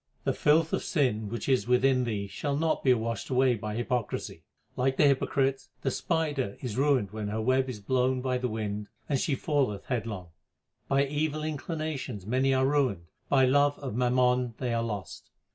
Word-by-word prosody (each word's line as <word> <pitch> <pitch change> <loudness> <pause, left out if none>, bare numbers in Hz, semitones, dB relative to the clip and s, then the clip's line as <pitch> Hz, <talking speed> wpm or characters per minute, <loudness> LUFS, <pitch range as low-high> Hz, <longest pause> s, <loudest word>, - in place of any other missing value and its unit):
The - - +1
filth 155 +2 +3
of - - 0
sin 120 - 0
which 120 +2 -4
is 130 -3 +2
within 125 +1 +3
thee 105 -4 -2
shall 140 +8 -3
not 160 +1 0
be 130 - +5
washed 115 -3 -3
away 130 -1 +3
by 105 -2 -4
hypocrisy. 120 0 -2 0.3
Like 130 +1 0
the - - +5
hypocrite, 135 -1 +1 0.2
the 135 - +1
spider 145 - -1
is 120 -5 -4
ruined 135 -8 +2
when 110 -1 -4
her 105 +2 -2
web 130 +3 +2
is 120 -5 -5
blown 130 +4 +1
by 125 0 -1
the 125 - -1
wind 105 -1 -3 0.2
and 140 -3 +1
she 140 - 0
falleth 135 -8 -1
headlong. 110 -8 -3 0.6
By 140 +1 +3
evil 150 +2 -1
inclinations 155 - -4
many 130 +5 +2
are 130 0 +3
ruined; 130 - +1 0.2
by 135 -2 +5
love 145 +2 +3
of 135 -5 -5
mammon 125 0 +2
they 125 -3 -2
are 115 - +1
lost. 105 -4 -5
130 Hz, 180 wpm, -28 LUFS, 115-140 Hz, 0.6 s, be